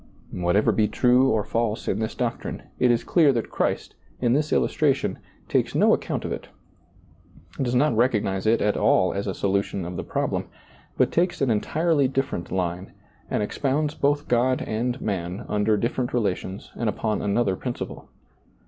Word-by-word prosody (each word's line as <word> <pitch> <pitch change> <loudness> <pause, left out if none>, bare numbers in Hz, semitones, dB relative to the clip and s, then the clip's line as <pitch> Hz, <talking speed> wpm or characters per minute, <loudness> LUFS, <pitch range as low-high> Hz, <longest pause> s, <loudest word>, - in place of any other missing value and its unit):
Whatever 90 +4 +2
be 110 -1 +2
true 125 +3 +3
or 110 -4 +1
false 115 -1 -2
in 100 - 0
this 110 0 -3
doctrine, 120 -2 -3 0.2
it 125 - +4
is 120 -1 +2
clear 160 -5 +4
that 115 -2 -3
Christ, - - -1 0.3
in 120 - +2
this 150 +2 0
illustration, 140 -3 +1 0.3
takes - - 0
no - - +5
account - - -2
of - - -3
it, - - -5 1.1
does 125 -1 0
not 140 0 +3
recognize 105 -5 +1
it 115 +1 +3
at 105 0 +2
all 95 -1 +3
as 100 +1 -3
a 95 - -2
solution 100 -2 -1
of 90 0 -5
the - - -3
problem, - - -2 0.5
but - - +3
takes 175 +1 +1
an 135 -4 +2
entirely 150 +6 +2
dif 135 +1 -1
ferent 85 - -4
line, 90 0 -3 0.4
and - - 0
expounds 145 +7 -1
both 145 0 0
God 125 +2 +2
and 120 +3 -2
man 95 +1 -3
under 105 +1 +1
different 120 +3 -1
relations 100 -3 -2
and 115 -2 -1
upon 105 0 -1
another 100 -1 +1
princi - - -4
ple. - - -12
115 Hz, 175 wpm, -24 LUFS, 100-130 Hz, 1.1 s, no